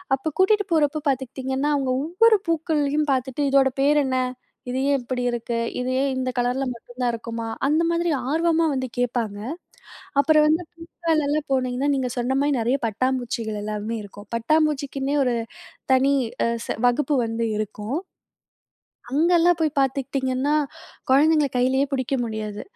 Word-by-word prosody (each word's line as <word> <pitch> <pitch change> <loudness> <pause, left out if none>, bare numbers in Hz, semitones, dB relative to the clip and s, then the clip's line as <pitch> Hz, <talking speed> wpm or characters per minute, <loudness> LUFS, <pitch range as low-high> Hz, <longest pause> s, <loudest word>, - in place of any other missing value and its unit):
அப்ப 300 +4 -4
கூட்டிட்டு 410 +2 +4
போறப்போ 305 -1 +2
பாத்துக்கிட்டிங்கன்னா, 265 +2 -2
அவங்க 270 -2 0
ஒவ்வொரு 425 +8 +4
பூக்களையும் 305 -2 0
பாத்துட்டு 260 +2 -2
இதோட 270 -1 +5
பேர் 295 +1 +4
என்ன? 260 -1 0 0.5
இது 255 - -1
ஏன் 275 - +2
இப்படி 250 +1 -3
இருக்கு? 235 0 -3 0.2
இது 250 0 -2
ஏன் 275 - +1
இந்த 255 0 -1
கலர்ல 245 +2 0
மட்டும் 240 +1 -15
தான் 245 -1 +2
இருக்குமா? 230 0 -5 0.2
அந்த 310 +4 +2
மாதிரி 340 0 0 0.2
ஆர்வமா 330 +2 +2
வந்து 260 -1 -2
கேட்பாங்க. 235 -4 -1 0.8
அப்புறம் 305 +1 +4
வந்து 320 +3 +2
பூக்கள்லாம் 315 -3 -1
போனீங்கன்னா, 255 +1 0
நீங்க 255 -2 -1
சொன்ன 250 +2 0
மாதிரி 285 -1 +2
நெறைய 245 +5 +1
பட்டாம்பூச்சிகள் 230 -2 -2
எல்லாமே 215 +2 -3
இருக்கும். 205 +1 -12
பட்டாம்பூச்சிக்குன்னே 285 +1 0
ஒரு 245 -2 +1 0.6
தனி 270 +2 +3 0.3
அ - - +1 0.2
செ - - -1
வகுப்பு 290 +4 +2
வந்து 225 0 -2
இருக்கும். 215 +5 -4 1.2
அங்கலாம் 340 +3 +4
போய் 310 -1 0
பாத்துக்கிட்டிங்கன்னா, 270 +1 0 0.5
கொழந்தைங்கள்ல 295 +2 +4
கையிலேயே 260 +3 +2
புடிக்க 265 0 -1
முடியாது. 215 -2 -5
270 Hz, 140 wpm, -23 LUFS, 245-300 Hz, 1.2 s, இதோட